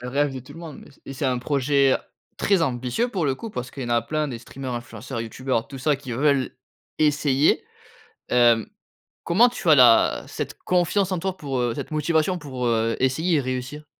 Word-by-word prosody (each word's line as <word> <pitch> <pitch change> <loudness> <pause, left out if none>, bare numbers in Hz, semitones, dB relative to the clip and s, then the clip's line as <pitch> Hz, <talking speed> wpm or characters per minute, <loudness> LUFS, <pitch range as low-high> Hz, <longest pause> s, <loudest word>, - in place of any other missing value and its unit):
Le 125 - -6
rêve 140 +2 0
de 130 - -5
tout 130 +4 -13
le - - -11
monde 165 -4 -9
mais - - -15
c 140 - -23
et 135 - -7
c'est 135 +1 -2
un 125 -1 +1
projet, 140 +1 +2
heu, - - +2 0.4
très 195 -4 +2
ambitieux, 125 - -1
pour 185 -10 -1
le 135 - +1
coup. 225 +10 -8
Parce 125 - -5
qu'il 135 - -7
y - - -4
en 120 - -4
a 120 -1 +2
plein 155 -1 -2
des 120 - -5
streamers, 130 +2 -7
influenceurs, 120 +1 -6
youtubeurs, 115 0 -2
tout 135 - -8
ça 150 +3 +2
qui 135 -3 -8
veulent 140 +1 +1 0.5
essayer. 145 -1 +3 0.7
Hem, 120 -3 +4 0.6
comment 225 +9 +4
tu 215 -7 -7
as 155 - +8
la 125 -4 +5
cette - - -5
confiance 180 +2 +1
en 185 - -1
toi 190 +2 -2
pour, 135 -3 -3
heu 120 -2 0
cette - - -6
motivation 160 +3 +1
pour, 130 -6 -4
heu, 115 0 +1
essayer 155 +6 +1
et - - +2
réussir? 130 +3 -5
135 Hz, 220 wpm, -23 LUFS, 125-155 Hz, 0.7 s, as